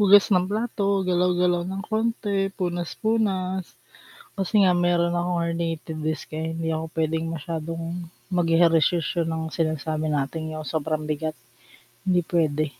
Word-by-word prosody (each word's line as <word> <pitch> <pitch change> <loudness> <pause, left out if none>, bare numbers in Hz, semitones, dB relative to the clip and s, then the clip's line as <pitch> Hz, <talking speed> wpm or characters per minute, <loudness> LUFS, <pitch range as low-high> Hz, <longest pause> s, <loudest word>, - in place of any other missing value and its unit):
hugas 205 0 +7
ng 180 0 +3
plato, 200 -2 0
galaw-galaw 180 -1 +2
ng 195 +1 -4
konti, 215 -3 0
punas-punas. 185 +1 -1 0.6
Kasi 200 +1 +2
nga 185 - +5
meron 175 -1 +2
akong 175 0 0
herniated 165 -1 -3
disc 155 +1 -3
'di 160 +1 -2
ako 160 0 -2
pwedeng 160 +1 0
masyadong 165 +2 -4 0.2
mag-ehersisyo 165 -1 +3
ng 160 -1 -3
sinasabi 155 -1 -1
nating 155 +2 -2
yung 155 - -5
sobrang 155 0 -2
bigat, 155 0 -2 0.7
hindi 180 -2 +2
pwede. 155 -3 +1
170 Hz, 120 wpm, -25 LUFS, 160-185 Hz, 0.7 s, hugas